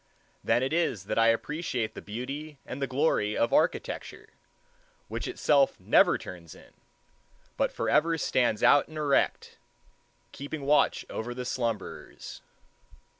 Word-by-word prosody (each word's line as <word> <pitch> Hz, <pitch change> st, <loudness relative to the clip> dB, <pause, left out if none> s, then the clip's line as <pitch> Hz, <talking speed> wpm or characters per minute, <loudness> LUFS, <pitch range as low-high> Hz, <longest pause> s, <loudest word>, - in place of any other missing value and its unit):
Then 120 Hz, -, +2 dB
it 135 Hz, +3 st, -1 dB
is 165 Hz, -, 0 dB
that 110 Hz, -, -1 dB
I 115 Hz, -, +5 dB
appreciate 120 Hz, -1 st, -1 dB
the -, -, -8 dB
beauty 135 Hz, +7 st, -6 dB
and 135 Hz, -, -7 dB
the 135 Hz, -, 0 dB
glory 130 Hz, -6 st, +1 dB
of 115 Hz, -, +1 dB
architecture, -, -, -1 dB, 0.8 s
which -, -, -4 dB
itself 145 Hz, -, +2 dB
never -, -, +4 dB
turns 85 Hz, -3 st, -10 dB
in, -, -, -18 dB, 0.8 s
but -, -, 0 dB
forever 165 Hz, +1 st, +1 dB
stands 120 Hz, -7 st, +1 dB
out 145 Hz, -, +5 dB
and 155 Hz, -, -10 dB
erect, 145 Hz, -2 st, 0 dB, 0.7 s
keeping 145 Hz, +1 st, -7 dB
watch 145 Hz, +2 st, +2 dB
over 120 Hz, +2 st, -5 dB
the 125 Hz, 0 st, -5 dB
slumberers. 115 Hz, -3 st, -5 dB
135 Hz, 130 wpm, -28 LUFS, 115-150 Hz, 0.8 s, I